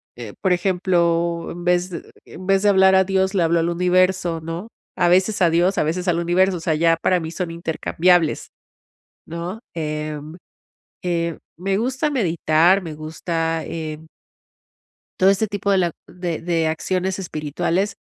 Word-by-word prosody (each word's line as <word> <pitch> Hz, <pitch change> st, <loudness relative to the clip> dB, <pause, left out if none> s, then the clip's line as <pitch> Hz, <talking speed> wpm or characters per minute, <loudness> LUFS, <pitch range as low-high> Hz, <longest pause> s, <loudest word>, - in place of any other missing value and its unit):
eh, 115 Hz, -4 st, -8 dB
por 185 Hz, -2 st, +3 dB
ejemplo, 170 Hz, -2 st, +1 dB
en 175 Hz, 0 st, -8 dB
vez 180 Hz, +1 st, +2 dB
de 170 Hz, -3 st, -8 dB
en 185 Hz, -, -11 dB
vez 195 Hz, 0 st, +3 dB
de 210 Hz, -, +3 dB
hablar 190 Hz, -1 st, +5 dB
a 190 Hz, -, +5 dB
Dios, 190 Hz, 0 st, 0 dB
le 185 Hz, -4 st, +2 dB
hablo 165 Hz, +1 st, +2 dB
al 165 Hz, -, 0 dB
universo. 180 Hz, -1 st, +1 dB
¿No?, 165 Hz, +7 st, -6 dB, 0.3 s
a 175 Hz, -, +2 dB
veces 190 Hz, +3 st, +2 dB
a 170 Hz, -, +5 dB
Dios, 175 Hz, +4 st, +2 dB
a -, -, +3 dB
veces 175 Hz, +4 st, -2 dB
al 170 Hz, -1 st, +2 dB
universo. 180 Hz, +2 st, +2 dB
O -, -, -7 dB
sea, 160 Hz, -1 st, 0 dB
ya 165 Hz, +1 st, +3 dB
para 180 Hz, +2 st, +1 dB
mí 160 Hz, -1 st, -5 dB
son 175 Hz, 0 st, -4 dB
intercambiables. 165 Hz, 0 st, +1 dB, 0.7 s
¿No?, 170 Hz, +6 st, -6 dB, 0.2 s
eh 150 Hz, -1 st, -3 dB, 0.9 s
eh, 170 Hz, -1 st, -1 dB, 0.2 s
me 195 Hz, +2 st, -1 dB
gusta 260 Hz, +7 st, -1 dB
meditar, 175 Hz, -, +3 dB
me 160 Hz, -3 st, -6 dB
gusta, 160 Hz, +1 st, -3 dB
eh 155 Hz, -1 st, -6 dB, 1.2 s
todo 190 Hz, +1 st, +6 dB
este 200 Hz, +2 st, +2 dB
tipo 200 Hz, 0 st, -2 dB
de 195 Hz, -, +4 dB
la 175 Hz, -2 st, +1 dB, 0.2 s
de 175 Hz, -3 st, -4 dB
de 165 Hz, -2 st, 0 dB
acciones 185 Hz, +4 st, -1 dB
espirituales, 175 Hz, +4 st, -2 dB
175 Hz, 165 wpm, -21 LUFS, 165-190 Hz, 1.2 s, todo